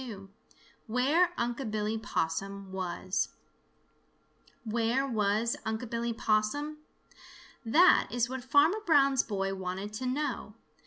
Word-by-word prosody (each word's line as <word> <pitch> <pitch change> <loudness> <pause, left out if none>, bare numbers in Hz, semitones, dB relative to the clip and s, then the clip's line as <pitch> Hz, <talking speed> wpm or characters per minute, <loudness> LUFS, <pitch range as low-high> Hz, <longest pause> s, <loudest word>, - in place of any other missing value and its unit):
XXII 200 -6 -8 0.6
WHERE 280 +10 +3
UNC' 240 0 -2
BILLY 215 +1 -1
POSSUM 195 0 -3
WAS 185 0 -2 1.3
Where 235 +4 0
was 215 -1 +1
Unc' 220 +2 -3
Billy 235 0 -1
Possum? 225 +8 0 0.8
That 310 +11 +5
is 235 +2 0
what 260 0 -5
Farmer 295 - +4
Brown's 275 - +4
boy 195 -2 -2
wanted 190 +2 -5
to 255 +4 -3
know. 255 -5 -3
230 Hz, 110 wpm, -30 LUFS, 205-260 Hz, 1.3 s, That